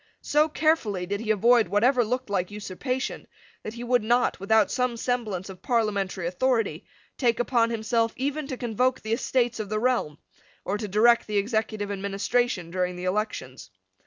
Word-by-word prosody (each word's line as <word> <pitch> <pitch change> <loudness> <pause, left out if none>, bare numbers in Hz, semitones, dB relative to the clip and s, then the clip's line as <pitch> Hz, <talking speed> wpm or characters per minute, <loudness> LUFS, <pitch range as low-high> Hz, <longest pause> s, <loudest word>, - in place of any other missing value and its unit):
So 300 +2 +3
carefully 290 - +1
did 200 +2 -3
he 225 0 -6
avoid 230 +1 +4
whatever 240 +7 +3
looked 250 +3 -2
like 185 -3 -1
usurpation 210 +6 -4 0.3
that 215 - -7
he 240 - -6
would 245 0 +2
not, 240 +3 +2
without 215 +2 +3
some 250 -2 0
semblance 225 -7 -2
of 190 -2 -10
parliamentary 200 -6 0
authority, 205 -2 0 0.3
take 235 -3 +2
upon 240 -1 +2
himself 230 0 0
even 285 +2 -2
to 260 -3 -5
convoke 250 +2 0
the 220 +1 -2
Estates 240 -1 0
of 210 -2 -4
the 215 - -1
Realm, 235 -11 0 0.5
or 205 +2 -1
to 210 - -3
direct 230 +4 +4
the 210 -1 -1
executive 215 -1 -1
administration 200 -1 -1
during 180 0 -1
the 180 +1 -6
elections. 210 +4 -3
220 Hz, 165 wpm, -26 LUFS, 200-245 Hz, 0.5 s, avoid